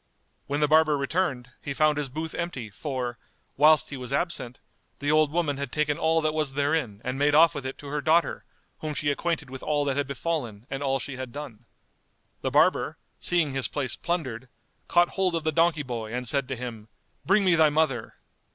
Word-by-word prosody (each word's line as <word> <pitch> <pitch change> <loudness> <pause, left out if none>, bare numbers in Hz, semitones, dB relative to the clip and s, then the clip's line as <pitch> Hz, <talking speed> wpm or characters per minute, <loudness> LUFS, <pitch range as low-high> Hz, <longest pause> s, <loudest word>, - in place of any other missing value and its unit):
When 145 +1 -1
the 150 - +4
barber 155 -1 +4
returned, 140 -4 -1
he 140 - -4
found 150 0 +3
his 145 -2 -2
booth 160 +4 -5
empty, 135 -11 -4
for, 125 0 -4 0.4
whilst 150 +1 +5
he 140 - -4
was 125 0 -7
absent, 140 -5 -2 0.4
the 145 +1 0
old 155 -1 +4
woman 155 -4 0
had 140 -3 -4
taken 150 -1 +1
all 160 0 +2
that 155 0 0
was 155 -3 -1
therein 140 -7 0
and 130 +2 -3
made 145 +1 +3
off 165 +2 +7
with 135 -2 -4
it 130 - -6
to 145 - -10
her 150 +1 -2
daughter, 160 +4 +2 0.4
whom 155 -1 -4
she 145 0 +1
acquainted 155 -2 -2
with 130 - -7
all 145 -1 0
that 140 -1 0
had 145 -2 0
befallen 130 -6 -3
and 135 +1 -3
all 135 -1 +1
she 135 0 -6
had 130 -2 -6
done. 125 -5 -8 0.8
The - - 0
barber, - - +3 0.2
seeing 170 -6 +2
his 135 -1 +1
place 135 -5 -2
plundered, 130 -8 -3 0.4
caught 175 0 +4
hold 185 -3 0
of 165 - -1
the 155 - +1
donkey 165 -1 +2
boy 115 -4 -5
and 125 +1 -3
said 140 +1 +1
to 130 - -3
him, 115 -3 -7 0.4
"Bring 195 +2 +3
me 180 - +5
thy 160 -2 +5
mother." 145 -6 0
145 Hz, 205 wpm, -26 LUFS, 130-155 Hz, 0.8 s, off